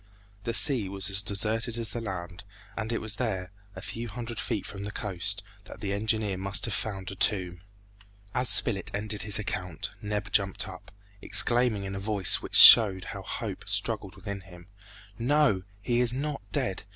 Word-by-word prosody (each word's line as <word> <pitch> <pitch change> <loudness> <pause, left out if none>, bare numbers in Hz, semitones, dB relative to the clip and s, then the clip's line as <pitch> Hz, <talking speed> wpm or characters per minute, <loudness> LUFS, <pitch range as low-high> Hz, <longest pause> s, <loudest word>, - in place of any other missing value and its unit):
The 115 - -2
sea 115 -5 +5
was 100 0 +2
as 95 0 +3
deserted 110 +3 -1
as 115 -3 -3
the 120 - -4
land, 95 -3 -7 0.3
and 110 0 -4
it 115 - -1
was 110 -1 +1
there, 95 -7 -3 0.2
a 95 - -9
few 115 +4 -5
hundred 115 +1 -7
feet 100 - -3
from 100 -1 -7
the 105 - -5
coast, 100 0 -2 0.2
that - - -12
the 100 -1 -3
engineer 105 -1 -1
must 100 +1 0
have 115 - -3
found 95 -2 -4
a - - -8
tomb. 90 -3 0 0.7
As 125 - +3
Spilett 95 -4 +4
ended 105 0 -2
his 105 +1 +1
account, 90 -5 -5
Neb 105 -1 -4
jumped 95 -2 0
up, - - -11 0.3
exclaiming 120 -4 +4
in 95 0 -6
a 95 - -5
voice 100 -2 -1
which - - -7
showed 100 -5 +8
how - - -7
hope - - -6
struggled - - -1
within 100 -1 -7
him, 90 -2 -15 0.5
"No! 135 -5 +2 0.2
he 120 +3 0
is 120 -2 +2
not 140 +2 -4
dead! 95 - -2
105 Hz, 180 wpm, -27 LUFS, 95-115 Hz, 0.7 s, showed